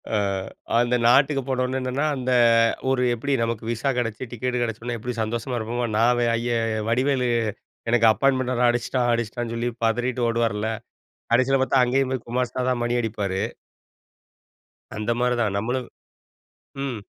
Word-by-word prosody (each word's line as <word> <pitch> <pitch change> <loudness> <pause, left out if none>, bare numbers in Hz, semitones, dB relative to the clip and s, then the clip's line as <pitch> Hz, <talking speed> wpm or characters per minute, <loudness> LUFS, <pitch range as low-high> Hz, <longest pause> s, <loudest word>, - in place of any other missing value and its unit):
அ, - - +3 0.6
அந்த 120 +1 +2
நாட்டுக்கு 135 +2 +4
போனவுடனே 130 0 -1
என்னன்னா, 130 +4 -1
அந்த 130 -1 -2 0.6
ஒரு 130 -1 +2
எப்பிடி, 140 +4 -2
நமக்கு 115 -1 -2
விசா 120 +4 -1
கெடைச்சி, 115 -1 -2
டிக்கெட் 125 +1 -2
கிடைச்சவுடனே 115 +1 -4
எப்பிடி 120 +2 -5
சந்தோஷமா 120 +3 -3
இருப்போமோ! 120 +2 -2
நான் 120 +2 +4
வே 120 - +2
ஐயா 120 0 -1 0.3
வடிவேலு 130 +2 +1 0.6
எனக்கு 115 -1 +4
அப்பாயின்ட்மென்ட் 130 +1 +1
ர - - +3
அடிச்சிட்டான், 120 +1 0
அடிச்சிட்டான்னு 115 0 -3
சொல்லி 120 +1 -1 0.2
பதறிட்டு 120 +2 0
ஓடுவார்ல, 115 -2 0 0.6
கடைசில 130 +2 +3
பாத்தா 130 0 +3
அங்கேயும் 130 +1 +1
போய் 130 - -4
குமாஸ்தா 125 +1 -1
தான் 125 -2 0
மணி 120 0 0
அடிப்பாரு. 100 -4 -2 1.6
அந்த 110 +2 -1
மாரி 125 0 +2
தான், 105 -3 0
நம்மளும் 125 +3 -2 1.0
ம். 120 -6 -4
120 Hz, 145 wpm, -24 LUFS, 115-130 Hz, 1.6 s, நாட்டுக்கு